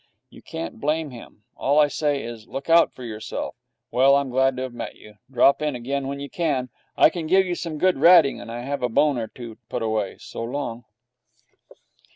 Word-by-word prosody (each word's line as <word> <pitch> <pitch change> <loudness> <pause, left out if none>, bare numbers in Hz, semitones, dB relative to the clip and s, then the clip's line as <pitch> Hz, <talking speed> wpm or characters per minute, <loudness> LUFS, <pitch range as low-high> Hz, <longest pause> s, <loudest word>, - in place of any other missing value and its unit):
You - - -14
can't 80 +4 -7
blame 150 0 -1
him. 115 -3 -13
All 140 +2 +1
I 150 -1 +6
say 145 -1 -1
is, 115 -2 -8
look 140 +4 -5
out 165 0 +6
for 130 - -12
yourself. 110 -2 -5 0.4
Well, 135 +2 +5
I'm 140 -2 0
glad 130 +1 +2
to 130 - -2
have 130 -2 -6
met 120 - -6
you. 105 -1 -16
Drop 135 +3 +4
in 150 -3 -1
again 135 +3 -3
when 140 +1 -4
you 140 - -5
can. 140 -6 -1 0.3
I - - +6
can 165 -2 -4
give 190 +3 +4
you 180 - -2
some 165 -3 -4
good 185 -2 +2
ratting, 165 -3 +6
and 115 - -8
I 120 +1 -5
have 140 +2 -4
a 125 - 0
bone 140 +2 +2
or 115 - -3
two 115 -1 -10
put - - -3
away. 110 -3 -1
So - - -8
long.' 120 -2 -4
135 Hz, 210 wpm, -23 LUFS, 120-150 Hz, 0.4 s, I